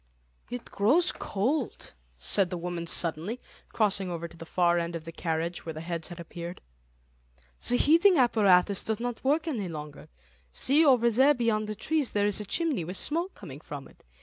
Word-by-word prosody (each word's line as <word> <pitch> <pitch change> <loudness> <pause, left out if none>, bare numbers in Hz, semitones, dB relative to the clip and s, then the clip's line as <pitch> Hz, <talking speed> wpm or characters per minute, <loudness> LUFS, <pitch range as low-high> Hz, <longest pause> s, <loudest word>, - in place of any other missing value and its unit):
"It 245 -1 -6
grows 280 - +2
cold," 250 +7 -3 0.2
said 175 - +1
the 180 - -4
woman 170 -1 -4
suddenly, 170 +8 +1 0.3
crossing 200 -3 +1
over 170 -1 -4
to 170 - -16
the 165 -1 -11
far 175 -1 +2
end 170 0 -3
of 165 -1 -6
the 165 - -7
carriage, 165 +1 -3
where 160 - -5
the 155 - -7
heads 165 -1 -3
had 175 -1 -9
appeared. 170 +1 -7 1.1
"The 245 - +4
heating 335 +6 +5
apparatus 200 -6 +4
does 220 -1 -1
not 240 -1 -4
work 300 +5 +1
any 225 - -2
longer. 150 -3 -8 0.4
See, 285 - +3
over 245 -5 +4
there 270 +6 +4
beyond 225 -3 0
the 215 - -3
trees, 295 +5 -1
there 205 -1 +2
is 205 0 +1
a 210 - -5
chimney 295 - 0
with 180 +4 -4
smoke 340 +5 -2
coming 145 -8 -10
from 145 -3 -8
it. - - -22
200 Hz, 185 wpm, -28 LUFS, 170-245 Hz, 1.1 s, heating